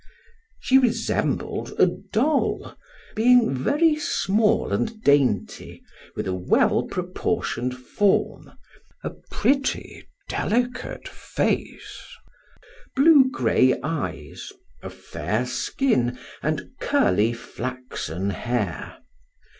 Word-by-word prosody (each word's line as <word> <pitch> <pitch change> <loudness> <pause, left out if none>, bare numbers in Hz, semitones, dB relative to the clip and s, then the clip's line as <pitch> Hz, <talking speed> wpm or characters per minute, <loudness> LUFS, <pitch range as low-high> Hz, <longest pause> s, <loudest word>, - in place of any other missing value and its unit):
She 265 +1 +4
resembled 245 -3 -1
a - - +7
doll, 275 +7 -1 0.4
being 240 - +4
very 300 - +2
small 215 -5 +1
and 225 -1 -1
dainty, 135 -9 +1 0.3
with - - -3
a 95 - -2
well 90 -1 +2
proportioned 125 +1 -2
form, 195 +10 0 0.5
a - - -3 0.2
pretty, 275 0 -1 0.2
delicate 245 +3 -2
face, - - -3 0.9
blue 275 -1 +6
gray 130 - +2
eyes, 160 - -5 0.3
a - - -7
fair - - -3
skin, 125 - 0 0.2
and - - -2
curly, 105 +6 +2
flaxen 115 -7 -5
hair. 105 -4 -3
165 Hz, 85 wpm, -24 LUFS, -, 0.9 s, a